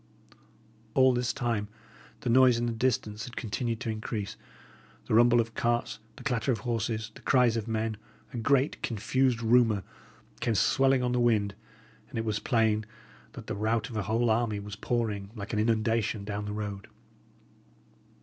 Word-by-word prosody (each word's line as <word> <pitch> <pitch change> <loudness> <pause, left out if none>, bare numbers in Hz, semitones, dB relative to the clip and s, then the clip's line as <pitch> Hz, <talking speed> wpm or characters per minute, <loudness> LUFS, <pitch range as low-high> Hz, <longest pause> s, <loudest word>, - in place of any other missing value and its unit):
All 130 -1 +6
this 125 -1 0
time 115 -6 -1 0.5
the - - -2
noise 125 -1 +6
in 120 - -1
the 120 - 0
distance 110 -2 -1
had 120 - -10
continued 115 +1 -2
to 115 -3 -2
increase; 110 -1 -4 0.7
the - - -3
rumble 120 +1 +6
of 115 0 -1
carts, 120 +1 -1 0.2
the - - -12
clatter 125 -2 0
of 110 -4 -2
horses, 110 -1 -2
the - - -14
cries 125 -3 +3
of 115 -1 -3
men, 110 -1 -1 0.4
a - - -4
great, 135 +4 +2
confused 120 +2 0
rumour, 115 -4 +4 0.6
came 115 -2 0
swelling 135 +3 +3
on 125 - +1
the 125 - +1
wind; 110 -4 +2 0.6
and 130 - -7
it 115 - -1
was 105 -1 -1
plain 110 -3 +2 0.5
that - - -9
the - - -4
rout 110 +4 -1
of - - -7
a 110 - 0
whole 115 +4 +1
army 110 -2 +1
was 100 0 -7
pouring, 105 -3 -2
like 100 0 -6
an 105 - +1
inundation, 110 -1 +1
down 105 0 -4
the 105 - -4
road. 105 -1 -5
115 Hz, 170 wpm, -29 LUFS, 105-120 Hz, 0.7 s, All